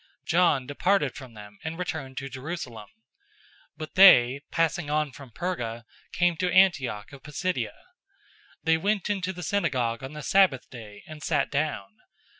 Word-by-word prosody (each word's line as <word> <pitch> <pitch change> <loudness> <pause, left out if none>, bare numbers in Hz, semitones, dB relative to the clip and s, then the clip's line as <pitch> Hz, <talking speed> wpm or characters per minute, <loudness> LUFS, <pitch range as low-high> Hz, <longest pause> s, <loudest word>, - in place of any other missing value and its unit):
John 165 -6 +3
departed 145 +1 +1
from 130 -5 -11
them 105 -1 -12
and 160 +1 -5
returned 155 -7 -5
to 135 - -4
Jerusalem. 130 - -7 0.9
013:014 - - -49
But 155 0 -7
they, 140 -9 +7
passing 165 -1 0
on 150 -1 0
from 135 0 -12
Perga, 120 -6 -4 0.3
came 175 -1 +2
to 180 +1 0
Antioch 145 - +2
of 140 - -11
Pisidia. 150 +6 -3 0.9
They 160 0 +3
went 205 +4 0
into 190 -2 -2
the 180 -1 -8
synagogue 125 -12 -1
on 135 +2 -7
the 150 -1 -7
Sabbath 190 -10 +3
day, 105 -4 -11
and 155 -1 -11
sat 145 -1 0
down. 140 -9 -2
150 Hz, 155 wpm, -26 LUFS, 130-175 Hz, 0.9 s, they